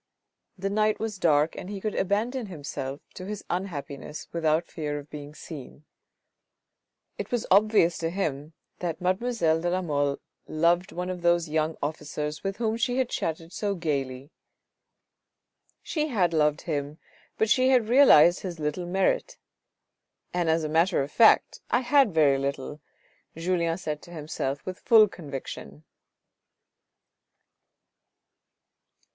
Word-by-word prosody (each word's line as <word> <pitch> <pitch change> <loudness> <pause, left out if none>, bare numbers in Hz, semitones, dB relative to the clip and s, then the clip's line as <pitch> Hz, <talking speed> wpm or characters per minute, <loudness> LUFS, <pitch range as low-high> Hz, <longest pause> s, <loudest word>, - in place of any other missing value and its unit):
The 195 +1 -2
night 215 +1 +2
was 215 -3 -4
dark 155 -2 +3
and 185 - -7
he 205 -1 -5
could 215 +1 -3
abandon 220 +5 -1
himself 145 -5 -6
to 185 - -8
his 210 -1 -6
unhappiness 150 -5 -5
without 160 0 +1
fear 150 -3 -4
of 145 0 -10
being 150 0 -8
seen. 150 -2 -10 1.3
It - - -4
was 240 -2 -1
obvious 200 -4 +4
to 165 - -1
him 155 -5 -3 0.3
that 170 -2 -3
mademoiselle 185 -3 +1
de 175 - 0
la 185 +1 0
Mole 145 -3 0 0.3
loved 170 +5 +1
one 180 +1 -3
of 180 -1 -6
those 170 -1 +2
young 155 +1 0
officers 150 0 -4
with 195 0 -3
whom 225 -1 0
she 245 +2 0
had 260 -2 +1
chatted 165 +1 -3
so 205 -2 -1
gaily. 140 -4 -3 1.5
She 305 -2 -1
had 190 - +1
loved 150 0 +2
him, 145 -2 -3 0.4
but 220 - +2
she 255 +4 +4
had 250 -4 +4
realised 205 - +7
his 175 -4 -6
little 155 +4 -2
merit, 195 - 0 0.5
" - - -51
and 175 -2 0
as 160 0 +2
a - - -1
matter 165 0 +2
of 140 - -7
fact 230 - +4
I - - +2
had 260 -2 +4
very 145 -4 +4
little," 140 +1 -4 0.6
Julien 170 -1 0
said 150 -5 -4
to 175 - -14
himself 145 -4 -4
with 185 0 -6
full 225 -3 +6
con 170 -6 -11
viction. 75 - -7
170 Hz, 145 wpm, -27 LUFS, 150-200 Hz, 1.5 s, realised